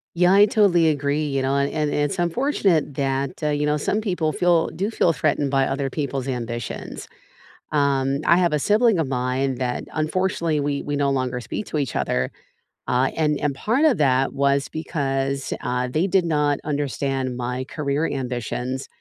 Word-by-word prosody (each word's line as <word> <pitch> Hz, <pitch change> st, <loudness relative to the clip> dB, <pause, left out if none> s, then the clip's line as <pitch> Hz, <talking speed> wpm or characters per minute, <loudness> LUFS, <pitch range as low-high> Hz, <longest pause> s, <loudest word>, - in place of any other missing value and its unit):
Yeah, 180 Hz, +2 st, +4 dB
I 200 Hz, +1 st, +7 dB
totally 195 Hz, -6 st, +4 dB
agree, 145 Hz, 0 st, 0 dB
you 135 Hz, -1 st, -1 dB
know, 135 Hz, +1 st, +1 dB
and 140 Hz, 0 st, +1 dB
and 150 Hz, -2 st, -1 dB
it's 145 Hz, -1 st, 0 dB
unfortunate 175 Hz, -, +1 dB
that, 135 Hz, +1 st, -2 dB
uh, 150 Hz, -, +2 dB
you 145 Hz, 0 st, 0 dB
know, 150 Hz, 0 st, +1 dB
some 205 Hz, +8 st, -1 dB
people 180 Hz, -7 st, -1 dB
feel 175 Hz, 0 st, +3 dB
do 200 Hz, +3 st, -2 dB
feel 180 Hz, -6 st, +2 dB
threatened 145 Hz, -2 st, 0 dB
by 135 Hz, -1 st, +3 dB
other 135 Hz, 0 st, -2 dB
people's 135 Hz, -2 st, -3 dB
ambitions. 120 Hz, -3 st, -5 dB, 0.6 s
Um, 140 Hz, -2 st, +1 dB
I 170 Hz, -, +6 dB
have 175 Hz, -3 st, +2 dB
a 150 Hz, -, +2 dB
sibling 215 Hz, +5 st, +3 dB
of 160 Hz, -, +1 dB
mine 130 Hz, +1 st, -1 dB
that, 125 Hz, -1 st, -2 dB
unfortunately, 165 Hz, 0 st, 0 dB
we 140 Hz, 0 st, -1 dB
we 145 Hz, -, -3 dB
no 140 Hz, -1 st, +1 dB
longer 130 Hz, -2 st, -1 dB
speak 195 Hz, -, -5 dB
to 155 Hz, -, -3 dB
each 140 Hz, -4 st, -2 dB
other, 65 Hz, +1 st, 0 dB, 0.6 s
uh, 130 Hz, +2 st, +2 dB
and 150 Hz, -2 st, +2 dB
and 145 Hz, -1 st, 0 dB
part 235 Hz, -, 0 dB
of 305 Hz, -6 st, +4 dB
that 135 Hz, -2 st, +2 dB
was 140 Hz, 0 st, +1 dB
because, 140 Hz, -4 st, -2 dB
uh, 125 Hz, 0 st, -1 dB
they 160 Hz, +7 st, +1 dB
did 190 Hz, -1 st, +3 dB
not 150 Hz, -3 st, +1 dB
understand 135 Hz, -3 st, -2 dB
my 125 Hz, +1 st, -3 dB
career 145 Hz, +2 st, -1 dB
ambitions 125 Hz, 0 st, -3 dB
145 Hz, 180 wpm, -23 LUFS, 135-160 Hz, 0.6 s, I